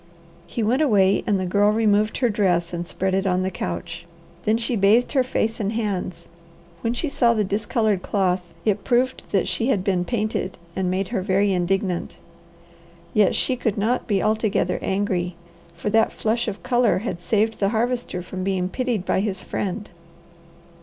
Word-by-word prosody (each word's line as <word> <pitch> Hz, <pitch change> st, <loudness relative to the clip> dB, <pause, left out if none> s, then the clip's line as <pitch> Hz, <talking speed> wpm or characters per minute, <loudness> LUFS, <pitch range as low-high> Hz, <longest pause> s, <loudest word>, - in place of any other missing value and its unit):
He 230 Hz, -, -3 dB
went 245 Hz, +7 st, +2 dB
away 200 Hz, -8 st, +3 dB
and 200 Hz, -2 st, +2 dB
the 185 Hz, -, -1 dB
Girl 200 Hz, +3 st, +3 dB
removed 215 Hz, -1 st, +2 dB
her 245 Hz, -2 st, +2 dB
dress 180 Hz, -5 st, +1 dB
and 175 Hz, 0 st, -3 dB
spread 190 Hz, +2 st, -2 dB
it 195 Hz, +1 st, +1 dB
on 185 Hz, 0 st, +1 dB
the 190 Hz, -, -1 dB
couch. 170 Hz, -1 st, -5 dB, 0.4 s
Then 215 Hz, +1 st, +3 dB
she 235 Hz, +1 st, -1 dB
bathed 215 Hz, +4 st, +4 dB
her 270 Hz, -, +3 dB
face 225 Hz, -3 st, -1 dB
and 210 Hz, 0 st, -1 dB
hands. 200 Hz, -5 st, -3 dB, 0.5 s
When 230 Hz, +1 st, -1 dB
she 315 Hz, -, -2 dB
saw 240 Hz, -4 st, +2 dB
the 215 Hz, -, +2 dB
discoloured 210 Hz, 0 st, 0 dB
cloth, 185 Hz, -3 st, 0 dB, 0.2 s
it 210 Hz, -1 st, +1 dB
proved 255 Hz, +1 st, +1 dB
that 195 Hz, -3 st, +2 dB
she 190 Hz, +5 st, -1 dB
had 205 Hz, -9 st, +1 dB
been 185 Hz, -2 st, +1 dB
painted, 215 Hz, -3 st, -2 dB, 0.2 s
and 190 Hz, -1 st, 0 dB
made 185 Hz, +1 st, -1 dB
her -, -, -1 dB
very 195 Hz, +1 st, +2 dB
indignant. 180 Hz, 0 st, -1 dB, 1.0 s
Yet 210 Hz, -2 st, +4 dB
she 260 Hz, -, +1 dB
could 225 Hz, -4 st, -1 dB
not 230 Hz, +5 st, 0 dB
be 200 Hz, -3 st, +1 dB
altogether 215 Hz, -1 st, +1 dB
angry, 185 Hz, -3 st, -1 dB, 0.4 s
for 170 Hz, +5 st, -3 dB
that 225 Hz, +1 st, +3 dB
flush 230 Hz, +2 st, -1 dB
of 210 Hz, -2 st, -5 dB
colour 245 Hz, -3 st, +3 dB
had 175 Hz, -, -3 dB
saved 215 Hz, +5 st, +1 dB
the 195 Hz, -, +2 dB
Harvester 235 Hz, -4 st, -1 dB
from 185 Hz, +1 st, -5 dB
being 185 Hz, -1 st, 0 dB
pitied 240 Hz, -5 st, -2 dB
by -, -, +1 dB
his 195 Hz, -1 st, -1 dB
friend. 205 Hz, +2 st, -4 dB
205 Hz, 180 wpm, -23 LUFS, 185-225 Hz, 1.0 s, bathed